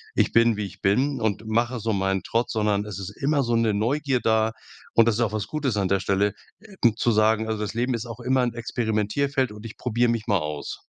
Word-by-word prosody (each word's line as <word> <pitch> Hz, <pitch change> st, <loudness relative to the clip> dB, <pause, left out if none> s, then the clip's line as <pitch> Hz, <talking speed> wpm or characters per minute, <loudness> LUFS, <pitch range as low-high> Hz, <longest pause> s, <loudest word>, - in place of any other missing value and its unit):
„Ich -, -, +2 dB
bin, 115 Hz, -2 st, +4 dB
wie 105 Hz, -, -2 dB
ich 95 Hz, -, -11 dB
bin 130 Hz, +8 st, +1 dB
und 110 Hz, 0 st, -1 dB
mache 120 Hz, +3 st, 0 dB
so 110 Hz, 0 st, -1 dB
meinen 95 Hz, -1 st, 0 dB
Trott.“ 115 Hz, +1 st, 0 dB
Sondern 105 Hz, -2 st, 0 dB
es 105 Hz, -2 st, -6 dB
ist 100 Hz, +1 st, -7 dB
immer 140 Hz, 0 st, +2 dB
so 120 Hz, -1 st, 0 dB
'ne 115 Hz, -2 st, +2 dB
Neugier 135 Hz, +5 st, 0 dB
da 110 Hz, -1 st, +2 dB, 0.4 s
und 115 Hz, 0 st, +6 dB
das 115 Hz, -, +3 dB
ist 120 Hz, -, -1 dB
auch 110 Hz, -3 st, +1 dB
was 110 Hz, -1 st, -2 dB
Gutes 140 Hz, -8 st, -2 dB
an 100 Hz, -2 st, +1 dB
der 95 Hz, 0 st, +2 dB
Stelle, 100 Hz, +1 st, +1 dB, 0.3 s
äh, 210 Hz, -1 st, -15 dB, 0.2 s
zu 120 Hz, +1 st, +1 dB
sagen:„Also, 110 Hz, 0 st, +2 dB
das 105 Hz, +1 st, -4 dB
Leben 125 Hz, +2 st, 0 dB
ist 115 Hz, 0 st, -4 dB
auch 115 Hz, -2 st, -8 dB
immer 130 Hz, 0 st, +1 dB
'n 120 Hz, -1 st, 0 dB
Experimentierfeld 120 Hz, +4 st, -1 dB
und 105 Hz, 0 st, -11 dB
ich 115 Hz, -, -9 dB
probier 120 Hz, 0 st, +1 dB
mich 115 Hz, -2 st, -1 dB
mal 100 Hz, -2 st, +2 dB
aus.“ 75 Hz, -2 st, -5 dB
110 Hz, 235 wpm, -24 LUFS, 105-120 Hz, 0.4 s, und